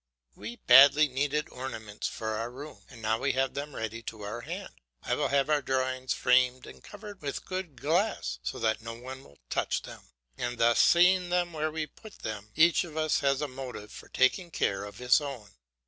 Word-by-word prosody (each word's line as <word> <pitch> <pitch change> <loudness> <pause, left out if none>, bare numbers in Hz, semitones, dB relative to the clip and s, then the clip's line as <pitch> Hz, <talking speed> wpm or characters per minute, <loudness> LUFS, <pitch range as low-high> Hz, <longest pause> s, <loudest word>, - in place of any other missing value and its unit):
We 110 +3 -7
badly 140 +5 +7
needed 145 +3 -1
ornaments 110 -5 -5
for 110 - -5
our 110 +2 -2
room, 140 +5 -10
and 115 -4 -13
now 110 +1 +1
we 140 - 0
have 135 0 0
them 145 0 -5
ready 110 +1 -4
to 110 -1 -8
our 110 +4 -5
hand. - - -7 0.3
I - - -1
will - - +1
have 140 0 +2
our 150 -1 +2
drawings 130 -1 -1
framed 125 0 +3
and - - -13
covered 205 -1 -10
with 140 -2 -4
good 185 -8 -5
glass, 155 - 0
so - - -4
that 110 0 0
no 115 0 -7
one 130 +3 -9
will 70 - -19
touch - - 0
them, - - -10 0.4
and 120 0 -2
thus 115 0 +4
seeing 180 +1 +5
them 175 -1 0
where 155 0 -1
we 155 0 -3
put 220 +7 -15
them, 105 -1 -5
each 160 +2 +5
of 160 -3 -9
us 155 -1 +2
has 140 -1 +1
a 150 - -1
motive 130 -5 -8
for - - -11
taking 150 +7 +2
care 100 -10 -1
of 100 - -10
his 125 +4 +4
own. 130 -8 -7
130 Hz, 205 wpm, -29 LUFS, 115-155 Hz, 0.4 s, badly